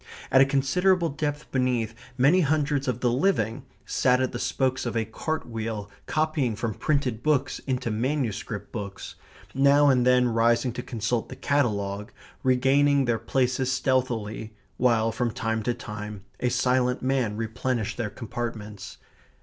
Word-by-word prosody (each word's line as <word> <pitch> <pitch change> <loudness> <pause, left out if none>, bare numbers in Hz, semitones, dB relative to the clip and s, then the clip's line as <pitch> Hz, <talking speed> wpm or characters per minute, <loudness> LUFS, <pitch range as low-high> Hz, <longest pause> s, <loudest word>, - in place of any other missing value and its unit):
At 130 - +7
a - - +7
considerable 170 +6 +2
depth 145 +1 -4
beneath, 125 -4 0 0.2
many 145 +9 +5
hundreds 145 -2 +1
of 125 -1 -1
the 120 - +2
living 120 - 0 0.2
sat 125 0 +2
at 130 -1 0
the 120 - -5
spokes 130 -1 0
of 115 - -2
a 110 - 0
cart 155 +8 -4
wheel 110 -3 -4 0.2
copying 155 -7 0
from 110 0 -2
printed 130 -3 -1
books 145 -1 +1
into 125 -3 -1
manuscript 115 -3 -2
books; 100 -4 -6 0.4
now 140 +2 +5
and 125 -2 +4
then 125 0 +4
rising 115 +1 +2
to 125 - -4
consult 115 -1 -2
the - - -7
catalogue; 105 -7 -1 0.3
regaining 135 +2 +3
their 120 -2 +1
places 130 +2 0
stealthily, 120 -5 -1 0.2
while 115 -2 +3
from 120 +1 -1
time 110 0 -2
to 120 +3 0
time 105 -3 -7 0.2
a 125 - +1
silent 125 0 +1
man 130 -5 0
replenished 115 0 -2
their 115 -3 -2
compartments. 110 -2 -6
125 Hz, 150 wpm, -26 LUFS, 110-135 Hz, 0.4 s, At